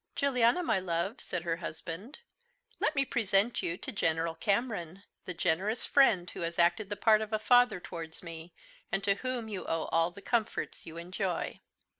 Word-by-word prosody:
"Juliana, 260 +3 +3
my 225 - +2
love," 180 +4 -2
said 175 -2 -3
her 165 -1 -1
husband, 170 - -6 0.6
"let 310 - +1
me 275 0 +2
present 220 -2 +1
you 170 +1 -2
to 265 - -5
General 165 -5 0
Cameron 195 -1 -1 0.2
the 180 - -4
generous 185 +7 0
friend 210 -11 +4
who - - -7
has 170 0 -3
acted 175 +4 +3
the 205 - -2
part 215 +1 +4
of 215 0 -4
a 215 - +2
father 245 -1 +4
towards 165 -2 -8
me, 165 0 -8 0.4
and 195 -1 0
to 200 - +4
whom 255 -3 -2
you 200 -4 -4
owe 165 -1 0
all 165 +1 +3
the 180 - -12
comforts 235 -3 -1
you 165 0 -7
enjoy." 180 +1 -3
195 Hz, 180 wpm, -31 LUFS, 170-225 Hz, 0.6 s, friend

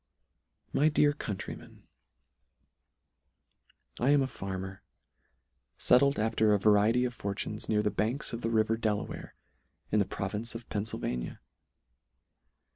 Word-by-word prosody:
My 150 +2 +4
Dear 150 -1 +4
Countrymen, 105 -9 -7 2.2
I 125 - +2
AM 145 -1 +5
a - - -1
FARMER, 95 -4 -6 1.0
fettled 140 +2 +4
after 110 -1 +3
a - - +1
variety 110 +4 +4
of 125 - -2
fortunes, 100 0 -4
near 105 -1 +2
the 105 - +1
banks, 120 +7 -1
of 115 - -4
the 115 - -1
river 110 0 +2
Delaware, 110 -2 -3 0.6
in 105 - +3
the 100 - +3
province 105 +6 -4
of 115 0 -7
Pennfylvania. 100 - -3
110 Hz, 120 wpm, -30 LUFS, 105-120 Hz, 2.2 s, AM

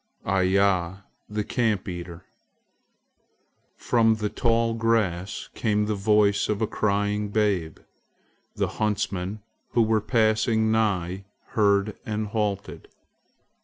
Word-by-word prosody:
IYA, 95 0 +1 0.3
THE 105 0 -2
CAMP 110 -4 0
EATER 85 -2 -7 1.5
FROM 115 -2 +2
the 105 -1 -2
tall 115 0 +1
grass 110 -5 -1
came 105 -2 0
the 105 - -1
voice 105 0 +2
of 105 -1 0
a 110 - +1
crying 105 0 -1
babe. 100 -7 0 0.8
The - - 0
huntsmen 100 -1 -2 0.3
who 120 -1 +4
were 110 -1 +2
passing 110 +1 +2
nigh 95 -4 0 0.2
heard 100 -1 +2
and 110 -3 -3
halted. 105 -2 -3
105 Hz, 105 wpm, -25 LUFS, 100-110 Hz, 1.5 s, who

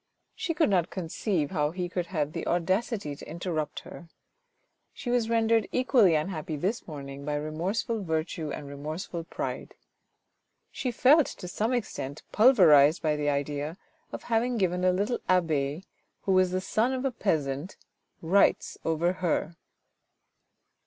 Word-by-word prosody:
She 330 - -3
could 315 -10 +3
not 180 -3 +2
conceive 170 -2 -2
how 150 -5 +1
he 180 +2 -3
could 175 -1 -3
have 155 -5 -1
the - - -4
audacity 185 -1 0
to - - -11
interrupt 165 -2 -3
her. 170 - -12 0.9
She 245 - -4
was 240 -2 +1
rendered 225 -1 +2
equally 245 - +4
unhappy 155 0 -2
this 190 +10 -2
morning 140 -3 -7
by 150 +1 -2
remorse 155 +8 -2
ful 230 -2 -2
virtue 160 -1 -2
and 145 - -5
remorseful 155 +4 -6
pride. - - -5 1.0
She 255 - -3
felt 265 +6 +5
to 180 - -8
some 215 +6 -1
extent 175 - -3
pulverised 170 - +6
by 155 -1 +2
the 150 0 0
idea 145 +3 -2 0.3
of - - -7
having 235 +1 0
given 180 -3 0
a 185 - +5
little 205 +6 0
abbe, 160 -3 +1 0.4
who 195 - 0
was 185 -1 +4
the 185 +1 -1
son 225 +6 +1
of 260 +1 -2
a 270 - +1
peasant, 155 - -2 0.5
rights 190 +5 +2
over 165 +2 +1
her. 175 -2 -1
175 Hz, 150 wpm, -28 LUFS, 155-210 Hz, 1.0 s, pulverised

